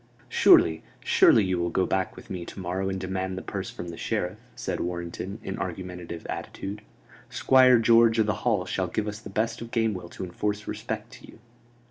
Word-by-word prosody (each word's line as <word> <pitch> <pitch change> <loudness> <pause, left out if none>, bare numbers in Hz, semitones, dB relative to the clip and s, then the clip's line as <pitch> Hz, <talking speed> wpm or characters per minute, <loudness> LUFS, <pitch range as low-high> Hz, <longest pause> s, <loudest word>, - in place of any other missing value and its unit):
"Surely, 80 -1 +5 0.2
surely, 110 - +6
you 95 -2 0
will 85 0 0
go 95 +2 +1
back 95 -1 -1
with - - -12
me 90 -2 -4
to 90 - -9
morrow 95 +1 -2
and 95 0 -3
demand 95 0 -3
the - - -4
purse - - -4
from 85 - -7
the 85 - -8
Sheriff?" 90 +4 -2 0.2
said 120 - -3
Warrenton, 85 +3 -4
in 95 - -5
argumentative 90 -2 -6
attitude. 100 +2 -5 0.5
"Squire 130 -1 +5
George 115 0 +5
o' - - +6
th' 105 - -3
Hall 105 -7 +1
shall 95 0 -1
give 105 +4 -2
us 105 0 -4
the 105 - -10
best 110 +4 -1
of 115 - -7
Gamewell 110 -7 -1
to - - -6
enforce 105 +3 -3
respect - - -5
to - - -13
you." - - -15
95 Hz, 195 wpm, -26 LUFS, 90-110 Hz, 0.5 s, surely